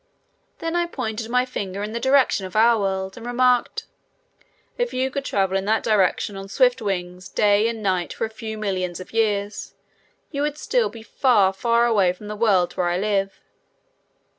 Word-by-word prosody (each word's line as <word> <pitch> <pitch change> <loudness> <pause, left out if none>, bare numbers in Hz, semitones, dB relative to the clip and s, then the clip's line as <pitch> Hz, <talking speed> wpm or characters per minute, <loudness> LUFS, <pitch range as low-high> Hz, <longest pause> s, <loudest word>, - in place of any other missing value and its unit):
Then 330 +1 -3
I 345 0 +1
pointed 225 -7 -4
my 250 +1 +2
finger 200 -5 -5
in 210 - -4
the 235 - -3
direction 265 -7 +3
of 185 - -14
our 230 +1 +5
world 190 0 -2
and 230 - -9
remarked: 245 0 +1 0.9
"If 485 0 -2
you 260 +1 0
could 280 0 -3
travel 195 -6 0
in 195 0 0
that 220 +2 +1
direction 205 -1 +1
on 195 0 -8
swift 250 +2 +3
wings 180 -2 -4
day 210 +2 +3
and 230 -2 -4
night 185 -3 0
for - - -2
a - - -6
few 220 0 -6
millions 185 -4 -2
of 185 - -11
years, 210 -2 -1 0.6
you 285 -2 -3
would 295 0 -1
still 240 -7 +1
be 220 +1 -11
far, 220 -6 +3
far 235 +4 +2
away 200 -6 +3
from 205 +3 -11
the 210 - -4
world 190 -5 +2
where 180 - -1
I 175 - 0
live." 195 -1 -1
215 Hz, 190 wpm, -23 LUFS, 195-240 Hz, 0.9 s, our